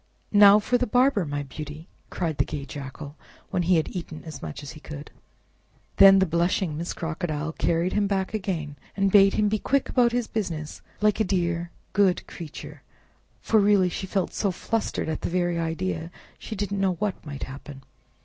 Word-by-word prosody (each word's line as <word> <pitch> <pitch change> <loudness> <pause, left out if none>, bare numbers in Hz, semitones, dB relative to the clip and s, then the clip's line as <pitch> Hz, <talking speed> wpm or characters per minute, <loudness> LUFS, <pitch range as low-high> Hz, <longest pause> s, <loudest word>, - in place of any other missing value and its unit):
"Now 205 0 +9
for 245 +4 +1
the 250 - 0
barber, 245 -4 +3
my 145 -1 -3
beauty!" 150 +3 -8 0.2
cried 165 -5 -3
the - - +5
gay 140 -2 -5
Jackal, 140 +1 -8 0.3
when 180 - +1
he 175 +1 +3
had 160 +2 -1
eaten 165 -3 -6
as 160 -2 -8
much 80 - -7
as 140 - -7
he 155 - -11
could. 150 -1 -9 0.9
Then 195 0 +9
the 190 - +4
blushing 170 0 0
Miss 170 +3 -3
Crocodile 160 -2 -3
carried 170 +2 0
him 205 -1 +2
back 195 0 -1
again, 170 -8 -3 0.2
and 195 -1 +2
bade 195 -1 +6
him 210 - +2
be 215 +1 0
quick 275 +4 0
about 240 -2 +3
his 245 -1 0
business, 165 -9 -4 0.2
like 210 0 +3
a - - +4
dear 175 -3 -1 0.2
good 195 -3 +3
creature, 160 -4 -9 0.6
for 220 - +3
really 200 -3 +4
she 190 +2 -5
felt 190 -1 -1
so 200 - 0
flustered 220 +3 -2
at 160 -1 -3
the - - -2
very 175 -1 0
idea 165 +1 -2
that 170 - -11 0.3
she 220 - -6
didn't 200 -1 -2
know 190 -1 +2
what 195 +2 -3
might 145 -3 -6
happen. 135 0 -9
180 Hz, 190 wpm, -25 LUFS, 155-200 Hz, 0.9 s, Now